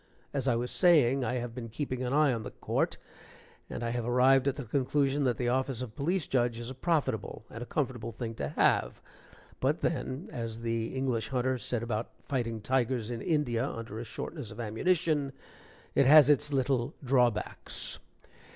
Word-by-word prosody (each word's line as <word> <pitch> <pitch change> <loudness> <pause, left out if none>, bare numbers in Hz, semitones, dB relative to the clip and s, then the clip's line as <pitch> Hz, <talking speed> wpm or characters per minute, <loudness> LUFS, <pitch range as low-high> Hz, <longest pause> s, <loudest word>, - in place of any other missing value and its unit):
As 135 -2 -1
I 125 - +3
was 120 +1 -2
saying, 140 -8 +4
I 125 +1 -1
have 120 -1 -3
been 120 -2 -6
keeping 130 +1 -3
an 125 - -2
eye 145 -1 +4
on 115 - -2
that - - -9
court, - - 0 0.7
and - - -5
I 115 - -1
have 120 0 -2
arrived 130 +3 +4
at 140 - +1
the 140 - -5
conclusion 140 +3 +1
that 125 -2 +1
the 120 -1 0
office 130 -1 0
of 115 -4 -8
Police 160 +3 0
Judge 120 -3 +1
is 120 +2 -5
a - - -5
profitable 135 -7 -1
and 115 - -7
a 120 - -5
comfortable 130 -6 -2
thing 115 0 -5
to 70 -10 -3
have, - - +2 0.6
but - - +1
then, 130 +7 -2
as 115 -1 -5
the 115 -1 -1
English 130 -4 0
hunter 130 -1 0
said 120 -1 -2
about 115 -1 -2 0.2
fighting 115 -5 -2
tigers 125 -1 0
in 115 -1 -4
India 140 -8 +1
under 115 -1 -6
a - - -4
shortness 125 +2 -6
of 105 - -10
ammunition, 145 +5 +1 0.6
"It 135 - +4
has 150 0 +9
its 145 +1 +2
little 135 -1 0
drawbacks." 125 -4 0
125 Hz, 185 wpm, -30 LUFS, 115-140 Hz, 0.7 s, has